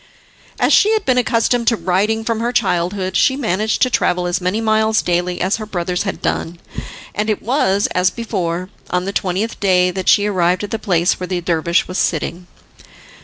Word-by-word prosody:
As - - +3
she 425 - +5
had 435 - 0
been 255 -1 +3
accustomed 235 0 +1
to 230 - +4
riding 205 +5 0
from 230 -1 -1
her 235 +1 -1
childhood, 185 -3 -1
she 265 - +3
managed 215 -4 0
to 255 - +3
travel 180 -5 +1
as 175 +1 -1
many 185 +4 0
miles 220 0 +2
daily 175 0 -1
as 185 +4 0
her 215 - -6
brothers 180 -2 -2
had 195 -2 -4
done, 170 +1 -2 0.6
and 210 +2 -2
it 215 - 0
was, 205 -5 +1
as 180 0 +3
before, 185 -5 -3 0.2
on 180 0 -1
the 195 - -3
twentieth 195 +5 -2
day 180 -2 +3
that 190 0 -2
she 205 - +5
arrived 185 -2 +1
at 205 - -5
the 225 - -2
place 180 -5 +1
where 180 - -4
the 180 -1 -2
dervish 170 0 0
was 185 - -3
sitting. 175 +2 -2
190 Hz, 195 wpm, -18 LUFS, 180-220 Hz, 0.6 s, she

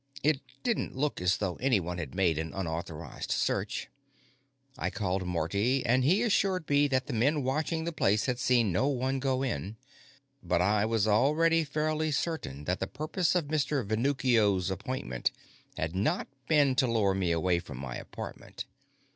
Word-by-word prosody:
It 150 -2 +2 0.2
didn't 240 -2 -1
look 140 -6 -1
as 90 +2 +2
though 95 -4 -2
anyone 95 -10 0
had 75 -4 -6
made 85 -5 +2
an 80 0 -4
unauthorized 80 -4 -5
search. - - -1 0.9
I - - -2
called 95 -3 -2
Marty, 100 +10 0
and 125 +2 +3
he 185 - +3
assured 195 -6 +1
me 145 0 +4
that 130 -2 0
the - - -5
men 140 +6 +2
watching 155 +5 -1
the 170 - -2
place 105 -9 +2
had 125 -2 -1
seen 120 -5 +3
no 95 +10 +2
one 135 -1 0
go 130 -1 0
in. 100 - -3 0.6
But 90 -5 +1
I 105 +3 +3
was 110 -2 +1
already 155 +9 +3
fairly 155 +1 -1
certain 145 - -2
that 90 +5 -1
the - - -2
purpose 160 +4 -1
of 175 -4 +2
Mr. 145 -3 0
Venuccio's 110 -5 +2
appointment 95 - -2 0.5
had 80 +2 -2
not 100 +3 0 0.2
been 145 -4 +4
to 135 -2 +4
lure 110 -5 +2
me 95 -3 0
away 85 +1 +2
from 70 -6 -9
my 65 -2 -5
apartment. - - -8
120 Hz, 165 wpm, -30 LUFS, 90-145 Hz, 0.9 s, me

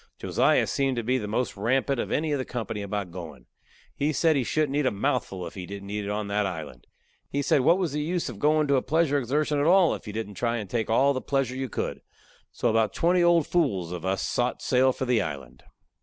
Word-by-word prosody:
Josiah - - +2
seemed 135 -2 0
to 120 - -2
be 130 +3 +1
the 105 - -5
most 115 +3 -1
rampant 130 +5 0
of - - -2
any 155 0 0
of 145 - 0
the - - -1
company 110 -4 -4
about 100 -2 -4
goin'. 85 -3 -9 0.5
He 145 +2 0
said 160 +1 +2
he 135 - +1
shouldn't 150 +2 0
eat 145 -2 +2
a - - +2
mouthful 95 -2 -2
if - - -8
he 90 -2 -7
didn't 100 +1 -8
eat 105 0 -3
it - - -4
on 105 0 -2
that 100 0 0
island. 80 -9 -7 0.4
He 140 +1 -1
said 140 - +3
what 170 +7 +4
was 175 -7 -1
the 150 - -1
use 175 +3 -1
of 115 -5 -7
going 155 +3 +3
to 140 - +4
a - - +2
pleasure 155 -1 +1
exertion 145 +3 0
at 145 - +2
all 180 -1 +5
if - - -8
you - - -4
didn't 110 -2 -4
try 120 +3 -1
to 110 - -4
take 110 +3 -2
all 135 +5 +4
the 130 - -3
pleasure 135 -3 -1
you 130 -1 -3
could. - - -4 0.5
So - - -1
about 110 -2 +1
twenty 175 +2 +3
old 170 -3 +4
fools 100 - 0
of 90 -2 -5
us 95 +1 -1
sot 125 0 -1
sail 130 0 +3
for 130 - -4
the 125 -3 +2
island. 70 -8 -6
125 Hz, 245 wpm, -26 LUFS, 105-145 Hz, 0.5 s, all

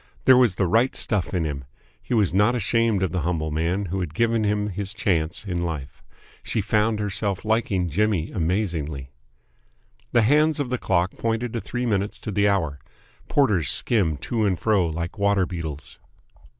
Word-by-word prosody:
There 130 - +8
was 125 -7 +4
the 95 - +1
right 115 +9 +2
stuff 105 -6 -1
in 90 -4 0
him. 70 -3 -4 0.4
He 125 - -2
was 100 -7 +2
not 105 +6 +3
ashamed 115 -2 +1
of 95 - 0
the 90 -1 -1
humble 80 -1 -1
man 85 +6 -1
who 95 +2 -3
had 80 -4 -4
given 115 0 +2
him 105 0 0
his 100 +2 -4
chance 85 -3 -1
in 90 -3 -2
life. 80 -6 -5 0.4
She - - -2
found 105 +1 +1
herself 100 -1 -2
liking 110 -5 +1
Jimmy 95 0 0
amazingly... 80 -7 -2 1.0
The 120 - +4
hands 150 +5 +3
of 135 -4 -2
the 125 - -1
clock 90 0 +1
pointed 115 +1 -1
to 115 - -2
three 125 0 -3
minutes 100 -2 -1
to 110 - -4
the 100 +1 +2
hour. 80 -8 0 0.5
Porters 100 - +2
skimmed 85 - +1
to 115 -2 -1
and 95 -4 +1
fro 100 -4 +2
like 85 +5 -4
water 100 -2 +3
beetles. 80 -5 -7
100 Hz, 175 wpm, -24 LUFS, 85-110 Hz, 1.0 s, There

